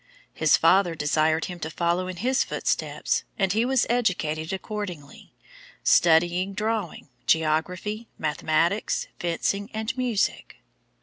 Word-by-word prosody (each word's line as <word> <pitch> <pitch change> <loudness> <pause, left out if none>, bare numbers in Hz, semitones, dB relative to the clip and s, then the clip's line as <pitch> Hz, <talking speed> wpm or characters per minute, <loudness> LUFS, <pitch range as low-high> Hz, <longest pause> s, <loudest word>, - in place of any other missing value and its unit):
His - - +4
father 185 -3 +4
desired 155 +1 +1
him 180 -1 -7
to 155 - -4
follow 175 +3 0
in 185 - -5
his 255 +9 +1
footsteps, - - -1
and 195 -3 +1
he 225 +3 +2
was 260 -1 +2
educated 170 -10 0
accordingly, 190 -7 -7 0.5
studying 175 +3 +3
drawing, 210 -7 -3 0.2
geography, 180 +8 0
mathematics, 160 +5 0
fencing, 200 +4 -1
and 220 +2 -2
music. 245 -5 -1
180 Hz, 115 wpm, -25 LUFS, 160-215 Hz, 0.5 s, His